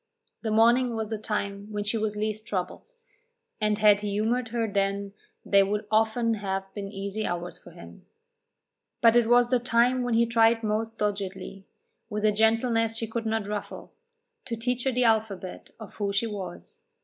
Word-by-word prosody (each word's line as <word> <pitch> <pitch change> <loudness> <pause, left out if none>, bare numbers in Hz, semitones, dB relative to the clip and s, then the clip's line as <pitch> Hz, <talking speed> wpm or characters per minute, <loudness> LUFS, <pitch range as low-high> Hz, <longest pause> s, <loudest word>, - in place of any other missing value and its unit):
The 225 - -2
morning 235 +3 +4
was 220 -1 -3
the 220 -2 -3
time 200 -1 -3
when 205 -1 -2
she 210 +3 -2
was 215 -1 -1
least 215 0 -3
troubled, 185 - -4 0.7
and 210 -1 +1
had 210 -1 +5
he 210 - -3
humoured 225 +4 0
her 230 0 -1
then 200 -1 -1 0.3
they 200 -1 +5
would 205 +2 -1
often 225 +2 +2
have 195 -2 -2
been 200 -1 -6
easy 200 +2 -4
hours 175 0 -4
for - - -14
him. - - -14 0.9
But 230 0 +6
it 240 -2 +4
was 240 0 +4
the 250 - +4
time 245 +1 +2
when 245 -2 0
he 235 +1 +4
tried 225 0 +3
most 220 +1 -2
doggedly, 195 -2 -4 0.4
with 210 -1 -2
a 215 - +5
gentleness 225 +1 +2
she 225 - -2
could 225 +1 -4
not 220 -1 -1
ruffle, 210 0 -6 0.5
to 230 - -3
teach 245 +2 -2
her 265 - +2
the 250 0 +1
alphabet 215 -5 -1
of 220 - -10
who 200 -2 -2
she 200 +3 +1
was. 195 -5 -7
215 Hz, 180 wpm, -27 LUFS, 205-230 Hz, 0.9 s, But